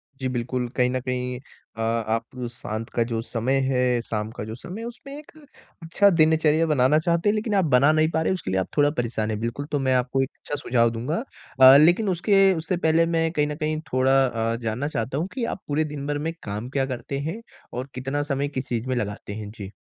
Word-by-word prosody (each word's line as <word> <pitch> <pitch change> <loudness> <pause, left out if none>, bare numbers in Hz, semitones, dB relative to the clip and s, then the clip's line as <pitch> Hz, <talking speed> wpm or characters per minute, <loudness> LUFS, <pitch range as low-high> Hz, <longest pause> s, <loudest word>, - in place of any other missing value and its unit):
जी, 130 -1 -3
बिल्कुल, 125 0 -2
कहीं 125 -1 +3
न 130 0 -1
कहीं 125 -1 -3 0.4
अ, - - -4
आप 115 0 0 0.3
शांत 115 -1 -6
का 120 - +1
जो 115 -1 -1
समय 120 +3 -1
है, 125 -2 +1
शाम 110 -1 -3
का - - -4
जो 110 +1 -6
समय 185 - -8
है 235 - -5
उसमें 260 +4 -10
एक 300 - -12 0.5
अच्छा 200 +5 +4
दिनचर्या 160 -1 +3
बनाना 145 0 +3
चाहते 170 +4 +1
हैं - - +3
लेकिन 215 -1 -1
आप 190 -3 +3
बना 140 +2 +5
नहीं 155 0 +3
पा 160 - 0
रहे, 175 - +1
उसके 175 - -4
लिए 95 - +1
आप 95 - -2
थोड़ा 145 0 +5
परेशान 115 -5 -2
है - - -1
बिल्कुल, 115 +5 -3
तो 145 -1 -2
मैं 130 -1 +1
आपको 125 +1 +1
एक 135 - -1
अच्छा 145 - -4
सुझाव 120 -4 +2
दूँगा। 140 - -3 0.4
अ, 130 +1 +10
लेकिन 175 +7 +4
उसके 195 +3 +3
उससे 170 +1 -2
पहले 165 0 +3
मैं 165 -1 0
कहीं 150 -3 +1
न 150 - -4
कहीं 155 0 -2
थोड़ा 135 +1 +4
अ, 115 -1 -1
जानना 115 +5 -2
चाहता 130 -1 -3
हूँ 170 +4 -1
कि 255 - -3
आप - - -9
पूरे 150 +2 +1
दिनभर 145 0 -3
में 165 - -2
काम 105 +4 -5
क्या 135 -1 0
करते 130 +1 -4
हैं 220 +7 -6 0.3
और 125 +3 -5
कितना 135 +3 -2
समय 140 +1 -1
किस 135 -2 -5
चीज़ 120 +1 -2
में 130 - 0
लगाते 100 -3 -4
हैं? 105 -1 -6
जी। 100 -3 -9
135 Hz, 230 wpm, -24 LUFS, 120-160 Hz, 0.5 s, अ